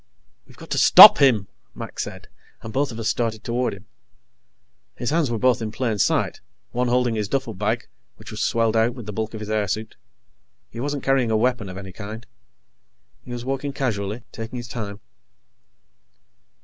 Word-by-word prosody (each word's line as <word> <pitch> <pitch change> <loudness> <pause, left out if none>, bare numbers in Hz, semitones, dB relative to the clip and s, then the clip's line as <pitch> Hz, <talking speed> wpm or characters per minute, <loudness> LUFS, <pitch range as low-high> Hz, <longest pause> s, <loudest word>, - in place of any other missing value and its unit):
"We've - - -18
got - - -13
to - - +1
stop - - +10
him," 115 -8 +4 0.3
Mac - - -8
said, - - -6 0.4
and 110 -1 -8
both 140 0 0
of 115 - -8
us 115 -1 -3
started 115 -2 -1
toward 120 +1 -1
him. 100 +1 -16 1.1
His 120 - -3
hands 160 -4 +1
were 115 - -1
both 125 +1 +2
in 110 -1 -3
plain 110 -2 -2
sight, - - +1 0.3
one 125 +1 0
holding 125 -1 +1
his 105 -2 -2
duffelbag, 125 -7 -2 0.3
which - - -12
was - - -5
swelled 115 -1 +1
out 115 +2 +2
with 120 -4 -9
the 105 - -6
bulk 110 +2 -4
of 110 - -7
his 105 - -6
airsuit. 110 +1 -2 0.8
He 115 - -8
wasn't 145 +2 -3
carrying 135 -3 +2
a 110 - +2
weapon 120 -3 0
of 90 - -8
any 95 -1 -8
kind. 110 +4 -8 1.0
He - - -11
was 120 0 -6
walking 135 +1 -3
casually, 110 -4 -3
taking 115 +2 -7
his 120 0 -6
time. 105 -4 -6
115 Hz, 180 wpm, -23 LUFS, 110-125 Hz, 1.1 s, stop